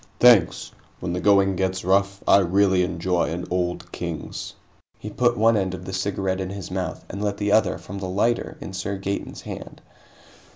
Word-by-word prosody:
"Thanks. 120 Hz, -8 st, +5 dB, 0.3 s
When 85 Hz, -1 st, -3 dB
the 90 Hz, -, -1 dB
going 100 Hz, -1 st, +4 dB
gets 95 Hz, 0 st, -1 dB
rough, 100 Hz, +1 st, +1 dB
I 100 Hz, -, +7 dB
really 95 Hz, 0 st, +3 dB
enjoy 90 Hz, 0 st, 0 dB
an 85 Hz, +2 st, -4 dB
Old 90 Hz, -1 st, -2 dB
Kings." -, -, -5 dB, 0.4 s
He 105 Hz, -, -7 dB
put 120 Hz, +2 st, +2 dB
one 115 Hz, +1 st, +4 dB
end 95 Hz, -2 st, 0 dB
of 90 Hz, 0 st, -10 dB
the 95 Hz, -, -6 dB
cigarette 95 Hz, 0 st, -1 dB
in 95 Hz, -, -3 dB
his 100 Hz, -2 st, -7 dB
mouth -, -, -4 dB
and 100 Hz, +3 st, -5 dB
lit 100 Hz, -1 st, -1 dB
the 105 Hz, 0 st, -1 dB
other 110 Hz, -, +3 dB
from 100 Hz, +1 st, -8 dB
the 95 Hz, -1 st, -4 dB
lighter 110 Hz, +5 st, 0 dB
in 95 Hz, -, -8 dB
Sir 95 Hz, +1 st, -3 dB
Gaeton's 100 Hz, +1 st, -4 dB
hand. -, -, -8 dB
95 Hz, 190 wpm, -24 LUFS, 90-100 Hz, 0.4 s, I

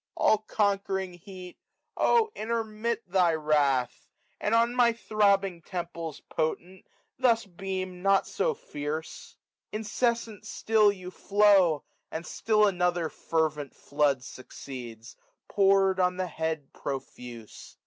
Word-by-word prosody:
45a -, -, -66 dB, 0.3 s
All 215 Hz, -, +4 dB
conquerikg 195 Hz, -3 st, -1 dB
Heat! 185 Hz, -2 st, -11 dB, 0.4 s
oh 455 Hz, -2 st, +3 dB
intermit 225 Hz, +1 st, -2 dB
thy 175 Hz, -3 st, +3 dB
wrath 145 Hz, -5 st, +1 dB
y -, -, -11 dB
And 220 Hz, -, +3 dB
on 235 Hz, +1 st, +3 dB
my 240 Hz, -2 st, +4 dB
throbbing 200 Hz, -4 st, +1 dB
temples 170 Hz, -3 st, -6 dB
potent 175 Hz, +4 st, -3 dB, 0.3 s
thus 235 Hz, -3 st, +3 dB
Beam 185 Hz, -1 st, -5 dB
not 195 Hz, 0 st, +3 dB
so 485 Hz, -2 st, -1 dB
fierce. 150 Hz, -, -6 dB, 0.3 s
Incessant 220 Hz, 0 st, -1 dB
sdll 215 Hz, -2 st, +2 dB
you 180 Hz, 0 st, -8 dB
flow. 195 Hz, -6 st, +4 dB, 0.3 s
And 160 Hz, +2 st, -5 dB
still 215 Hz, 0 st, +2 dB
another 180 Hz, -4 st, +1 dB
fervent 155 Hz, -4 st, -2 dB
flood 140 Hz, -3 st, 0 dB
succeeds, 120 Hz, -4 st, -9 dB, 0.3 s
Pour'd 195 Hz, -1 st, +3 dB
on 180 Hz, 0 st, +2 dB
the 185 Hz, -, -1 dB
head 160 Hz, -4 st, -4 dB
profuse. 125 Hz, -4 st, -8 dB
185 Hz, 120 wpm, -28 LUFS, 160-210 Hz, 0.4 s, All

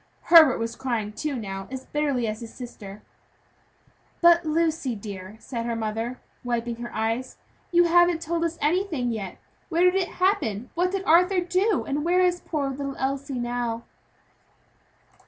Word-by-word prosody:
Herbert 315 Hz, -6 st, +9 dB
was 230 Hz, 0 st, -3 dB
crying, 230 Hz, -5 st, -2 dB
too, 300 Hz, +4 st, -3 dB
now, 195 Hz, -4 st, -5 dB
as 260 Hz, 0 st, -7 dB
bitterly 285 Hz, -5 st, 0 dB
as 215 Hz, 0 st, -3 dB
his 230 Hz, -1 st, -8 dB
sister. 210 Hz, -5 st, -10 dB, 1.2 s
"But, 345 Hz, 0 st, +6 dB
Lucy 315 Hz, -5 st, 0 dB
dear," 200 Hz, -1 st, -8 dB
said 230 Hz, +1 st, -5 dB
her 235 Hz, -, -1 dB
mother, 225 Hz, +2 st, -3 dB, 0.2 s
wiping 235 Hz, -1 st, -2 dB
her 240 Hz, 0 st, -7 dB
eyes, 225 Hz, +4 st, -2 dB, 0.3 s
"you 350 Hz, 0 st, +5 dB
haven't 345 Hz, 0 st, +4 dB
told 335 Hz, +1 st, -2 dB
us 335 Hz, 0 st, -2 dB
anything 310 Hz, -6 st, 0 dB
yet. 200 Hz, -5 st, -5 dB, 0.3 s
Where 335 Hz, +2 st, +2 dB
did 360 Hz, 0 st, +5 dB
it 375 Hz, -2 st, -1 dB
happen? 280 Hz, -, 0 dB
What 355 Hz, +2 st, +1 dB
did 385 Hz, 0 st, -3 dB
Arthur 360 Hz, +3 st, +5 dB
do? 365 Hz, +3 st, +1 dB
And 290 Hz, +1 st, -1 dB
where 350 Hz, +2 st, +2 dB
is 355 Hz, -1 st, +2 dB
poor 285 Hz, -4 st, -2 dB
little 275 Hz, 0 st, -5 dB
Elsie 275 Hz, 0 st, -2 dB
now?" 240 Hz, -1 st, -2 dB
270 Hz, 155 wpm, -25 LUFS, 230-340 Hz, 1.2 s, Herbert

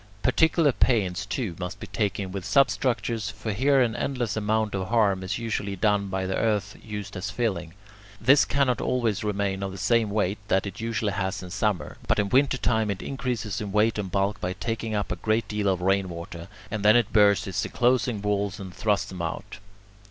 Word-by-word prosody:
Particular 160 Hz, -2 st, +4 dB
pains, 100 Hz, -6 st, +1 dB
too, 105 Hz, -7 st, -3 dB
must 90 Hz, 0 st, -5 dB
be -, -, -6 dB
taken 100 Hz, -3 st, -2 dB
with 95 Hz, -1 st, -5 dB
substructures, 120 Hz, -3 st, +1 dB
for 110 Hz, +2 st, -5 dB
here 135 Hz, +6 st, +3 dB
an 115 Hz, -3 st, +1 dB
endless 125 Hz, -6 st, -2 dB
amount 110 Hz, 0 st, 0 dB
of 95 Hz, -1 st, -2 dB
harm 105 Hz, -4 st, +2 dB
is 95 Hz, +2 st, -3 dB
usually 110 Hz, -4 st, -3 dB
done 100 Hz, +1 st, +1 dB
by 95 Hz, 0 st, -2 dB
the 95 Hz, -, -1 dB
earth 105 Hz, -3 st, 0 dB
used 105 Hz, -2 st, -6 dB
as 90 Hz, -, -3 dB
filling. 95 Hz, -8 st, -2 dB, 0.4 s
This 135 Hz, +5 st, +6 dB
cannot 135 Hz, -3 st, +1 dB
always 115 Hz, -6 st, 0 dB
remain 100 Hz, -2 st, -1 dB
of 100 Hz, -1 st, -3 dB
the 95 Hz, -, -8 dB
same 115 Hz, +2 st, +2 dB
weight 100 Hz, -1 st, 0 dB
that 95 Hz, -1 st, +2 dB
it 100 Hz, -, -6 dB
usually 115 Hz, -3 st, -1 dB
has 95 Hz, +1 st, -2 dB
in 90 Hz, -, -9 dB
summer, 100 Hz, -7 st, -1 dB
but -, -, +2 dB
in 100 Hz, -1 st, +1 dB
winter 130 Hz, +3 st, +3 dB
time 110 Hz, -3 st, +1 dB
it 100 Hz, -2 st, -3 dB
increases 120 Hz, -7 st, -3 dB
in 105 Hz, -2 st, -4 dB
weight 105 Hz, +2 st, +2 dB
and 95 Hz, -3 st, -4 dB
bulk 100 Hz, +2 st, 0 dB
by 90 Hz, +1 st, -1 dB
taking 115 Hz, +1 st, -3 dB
up 105 Hz, -, -2 dB
a 90 Hz, -, -2 dB
great 110 Hz, +5 st, 0 dB
deal 105 Hz, -1 st, -1 dB
of 95 Hz, -2 st, +1 dB
rain 95 Hz, 0 st, +2 dB
water, 85 Hz, 0 st, -7 dB, 0.2 s
and 110 Hz, -2 st, -3 dB
then 105 Hz, +2 st, +6 dB
it 120 Hz, -2 st, +2 dB
bursts 105 Hz, -2 st, +5 dB
its 95 Hz, -2 st, -2 dB
enclosing 120 Hz, -3 st, +1 dB
walls 100 Hz, 0 st, -1 dB
and 95 Hz, -2 st, -8 dB
thrusts 105 Hz, 0 st, +1 dB
them 90 Hz, -2 st, -6 dB
out. 85 Hz, +3 st, -5 dB
105 Hz, 205 wpm, -26 LUFS, 95-115 Hz, 0.4 s, This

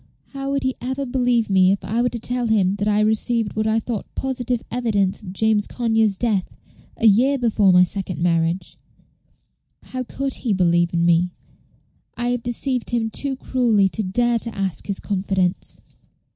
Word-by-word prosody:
"How 275 Hz, 0 st, -4 dB
would 275 Hz, 0 st, -1 dB
he 260 Hz, 0 st, 0 dB
ever 260 Hz, +3 st, -3 dB
believe 245 Hz, -3 st, +1 dB
me 190 Hz, -1 st, +4 dB
if 200 Hz, -, -2 dB
I 230 Hz, +3 st, 0 dB
were 245 Hz, -, +2 dB
to 240 Hz, -, -4 dB
tell 245 Hz, +1 st, 0 dB
him 200 Hz, -4 st, +2 dB
that 205 Hz, +1 st, -1 dB
I 210 Hz, -1 st, +2 dB
had 215 Hz, -, +3 dB
received 220 Hz, 0 st, 0 dB
what 215 Hz, 0 st, 0 dB
I 220 Hz, +1 st, +2 dB
thought 225 Hz, -2 st, -5 dB
positive 250 Hz, -3 st, -2 dB
evidence 215 Hz, -6 st, 0 dB
of 190 Hz, -4 st, -8 dB
James 210 Hz, +1 st, +1 dB
Conyers' 225 Hz, -4 st, +1 dB
death 210 Hz, -5 st, -1 dB, 0.4 s
a -, -, -1 dB
year 245 Hz, +7 st, +4 dB
before 220 Hz, -6 st, +3 dB
my 180 Hz, 0 st, +6 dB
second 185 Hz, -3 st, -3 dB
marriage? 170 Hz, +1 st, 0 dB, 1.1 s
How 255 Hz, -, -5 dB
could 270 Hz, +2 st, -3 dB
he 230 Hz, -5 st, -1 dB
believe 175 Hz, -2 st, +2 dB
in 170 Hz, 0 st, +1 dB
me? 170 Hz, +1 st, +3 dB, 0.9 s
I 240 Hz, 0 st, -1 dB
have 245 Hz, -1 st, -1 dB
deceived 245 Hz, +1 st, -1 dB
him 230 Hz, -2 st, -1 dB
too 275 Hz, +2 st, 0 dB
cruelly 235 Hz, -7 st, +1 dB
to 220 Hz, -, -3 dB
dare 235 Hz, +4 st, +1 dB
to 230 Hz, 0 st, -3 dB
ask 195 Hz, -4 st, -2 dB
his 200 Hz, -2 st, -2 dB
confidence." 190 Hz, -2 st, -1 dB
220 Hz, 180 wpm, -21 LUFS, 195-245 Hz, 1.1 s, my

